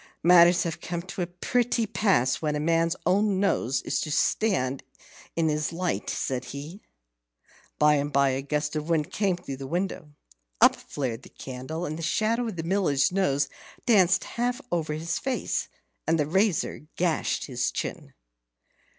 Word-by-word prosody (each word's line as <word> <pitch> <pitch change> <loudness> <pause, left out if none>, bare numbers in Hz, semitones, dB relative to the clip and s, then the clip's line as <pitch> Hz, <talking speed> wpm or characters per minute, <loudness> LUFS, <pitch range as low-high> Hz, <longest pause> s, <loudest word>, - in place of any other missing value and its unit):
"Matters 175 +1 +7
have 170 -3 -4
come 170 -1 -4
to 185 +1 -6
a 175 - -1
pretty 230 +6 0
pass, 195 - +1
when 150 -2 0
a - - -1
man's 165 +2 +2
own 195 +2 +2
nose 135 -9 +1
is - - -1
to 155 - -3
stand 145 -4 +1 0.5
in 165 -1 +2
his 150 0 0
light," 175 +1 -2
said 130 -1 -2
he. 150 - -8 1.0
By 150 0 +5
and 145 +1 -1
by 140 -1 +4
a 130 +1 -1
gust 150 +2 -2
of 155 +2 -3
wind 160 -3 +1
came 195 -4 +1
through 140 -7 -7
the 135 0 -7
window. 175 -1 -3 0.5
Up - - +7
flared 125 -4 -4
the - - -14
candle, 135 +6 -6
and 155 0 -4
the - - -5
shadow 225 +8 +1
of 220 - -4
the 165 - -4
Miller's 170 -6 +2
nose 180 -7 +1 0.4
danced 195 -5 +4
half 245 +1 -2
over 160 -3 -1
his 165 +3 -2
face, 265 -1 -2 0.4
and 165 +1 +3
the 150 - +1
razor 180 -3 0
gashed 170 -2 0
his 125 -3 -1
chin. - - -5
165 Hz, 165 wpm, -26 LUFS, 150-190 Hz, 1.0 s, Matters